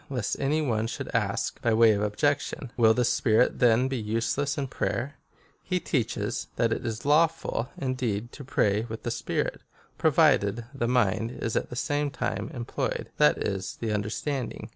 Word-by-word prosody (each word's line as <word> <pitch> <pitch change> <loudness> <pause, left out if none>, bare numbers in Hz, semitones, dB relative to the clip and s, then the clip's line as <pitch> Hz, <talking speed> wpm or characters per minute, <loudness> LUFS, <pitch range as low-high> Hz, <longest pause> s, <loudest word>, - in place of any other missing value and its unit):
Lest 125 -6 -2
any 150 +3 +1
one 115 -5 0
should - - -5
ask, - - -1
by 115 -2 +2
way 115 0 +6
of 105 -1 0
objection, 130 +4 -1
" - - -32
Will 110 -2 +5
the 125 - +2
spirit 115 0 +2
then 120 +1 +4
be 135 -1 -2
useless 115 +7 -1
in 140 - -1
prayer 130 +1 -2 0.6
V 185 - +1
he - - +2
teaches, 135 -9 -2
that 115 -1 +2
it - - -4
is 115 0 -4
lawful, 155 -4 +2
indeed, 120 -4 -2
to 140 - -9
pray 105 -5 +1
with 110 0 -6
the 120 - -2
spirit, - - -2 0.4
provided 100 +3 +3
the 120 -4 -1
mind 115 -1 +1
be - - -4
at 115 - -1
the 125 - -7
same 145 +4 0
time 125 -3 -3
employed, 120 -2 -3
that - - +5
is, 95 -1 -3
the 110 -2 -1
understanding. 115 +6 -3
120 Hz, 180 wpm, -27 LUFS, 110-135 Hz, 0.6 s, way